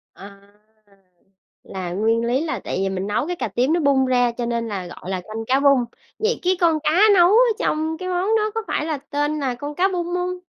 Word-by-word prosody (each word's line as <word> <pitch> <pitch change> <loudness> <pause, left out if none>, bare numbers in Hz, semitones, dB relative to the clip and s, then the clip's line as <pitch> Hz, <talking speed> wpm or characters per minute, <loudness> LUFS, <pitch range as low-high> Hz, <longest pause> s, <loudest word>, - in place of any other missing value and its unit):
À. 200 0 -13 1.2
Là 185 -2 -6
nguyên 225 +5 +1
lý 250 +4 +1
là 330 - -3
tại - - -4
vì 195 - 0
mình 190 0 -3
nấu 210 +9 -1
cái 355 - -2
cà - - -3
tím 255 +6 0
nó 345 - +2
bung 280 -3 +3
ra 245 -2 +2
cho 240 0 -4
nên 235 -1 -2
là 190 -4 -5
gọi 175 +1 -10
là 185 -1 -2
canh 220 +4 -7
cá 265 +2 +3
bung. 275 -3 +4 0.3
Vậy 450 +2 0
cái 370 +1 +2
con 330 -2 +3
cá 305 - +2 0.2
nấu 350 -1 +6
ở 470 +1 +5
trong 315 +1 -1
cái 370 +2 -5
món 370 +5 +1
đó 430 0 0
có 450 - -1
phải - - -1
là 315 -2 -2
tên 290 +2 -2
là 260 -3 -2
con 290 +4 -7
cá 370 +4 +3
bung 355 -3 -3
hông? 360 0 -2
280 Hz, 240 wpm, -21 LUFS, 230-350 Hz, 1.2 s, nấu